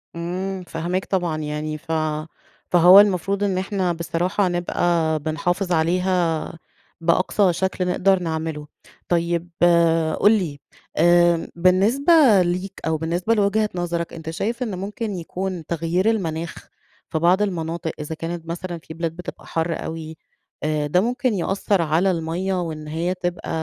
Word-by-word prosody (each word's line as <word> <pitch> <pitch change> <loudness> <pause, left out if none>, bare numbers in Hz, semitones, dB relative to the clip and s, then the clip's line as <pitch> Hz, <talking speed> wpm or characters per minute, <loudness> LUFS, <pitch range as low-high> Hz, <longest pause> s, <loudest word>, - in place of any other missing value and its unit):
إمم، 185 +3 -4
فاهماك 175 +3 -2
طبعًا، 175 -5 -1
يعني 155 0 -3
ف 165 +1 -9 0.8
فهو 180 +3 +8
المفروض 200 0 +2
إن 190 -2 0
إحنا 185 -2 -1
بصراحة 175 +4 0
نبقى 170 -2 0
بنحافظ 175 +5 -2
عليها 175 0 +1 0.5
بأقصى 180 +3 +2
شكل 185 +1 -1
نقدر 190 +1 +3
نعمله. 160 -3 -4 0.4
طيب، 170 0 0 0.7
قُل 205 - +6
لي 170 -10 0 0.4
آآ، 175 0 +4
بالنسبة 200 - +3 0.3
ليك 180 +2 -2
أو 160 -1 +1
بالنسبة 175 +7 0
لوجهة 210 0 +2
نظرك، 170 -1 -2
أنتَ 160 -1 -7
شايف 225 +9 -2
إن 210 -6 -4
ممكن 210 +2 -4
يكون 180 0 -4
تغيير 170 +6 0
المناخ 170 -6 -2 0.5
في 160 - -1
بعض 180 +4 +3
المناطق، 165 -4 -2
إذا 150 +2 -5
كانت 165 +1 -5
مثلًا 175 +1 -4
في 160 - -9
بلاد 165 0 -3
بتبقى 180 - -9
حَر 165 0 -2
أوي 160 0 -6 0.5
آآ، 150 -1 0
ده 180 +5 +3
ممكن 245 +2 0
يأثر 195 0 0
على 165 +4 +2
المَيّة 170 +3 -2
وإن 155 -2 -5
هي 165 +4 -1
تبقى 175 -1 -4
175 Hz, 135 wpm, -22 LUFS, 165-190 Hz, 0.8 s, فهو